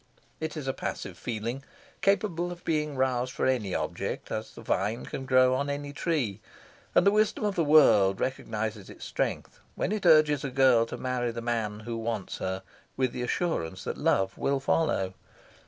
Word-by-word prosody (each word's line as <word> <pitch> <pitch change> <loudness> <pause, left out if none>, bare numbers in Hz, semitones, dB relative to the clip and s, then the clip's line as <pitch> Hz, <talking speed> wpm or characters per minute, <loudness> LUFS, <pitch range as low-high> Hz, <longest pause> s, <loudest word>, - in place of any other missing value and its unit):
It 160 -1 -4
is 145 -3 -5
a 135 - 0
passive - - -5
feeling 120 +3 -4 0.4
capable 175 -4 +1
of 175 0 -10
being 150 -2 0
roused 130 -1 0
for - - -1
any 115 -8 0
object, - - -3
as 110 0 -4
the - - -10
vine 105 +5 -1
can 130 - -6
grow 130 0 +5
on 140 +2 -1
any 145 0 -4
tree; 130 - -1 0.5
and - - +5
the 200 - +6
wisdom 215 +1 +2
of 205 - +1
the 170 - +1
world 110 -11 +6
recognises 110 -5 -3
its - - -10
strength - - -3 0.2
when - - -1
it 210 -4 0
urges 155 -3 +5
a 140 - -2
girl 130 -3 +4
to - - -6
marry 125 -1 -1
the 115 0 -4
man 115 -3 -2
who 115 +1 -5
wants 115 -4 -3
her 95 0 -3 0.3
with 130 -2 +1
the 125 - -5
assurance 125 - -2
that - - -3
love 95 0 +1
will 140 0 +1
follow. 135 - +1
130 Hz, 185 wpm, -28 LUFS, 110-150 Hz, 0.5 s, the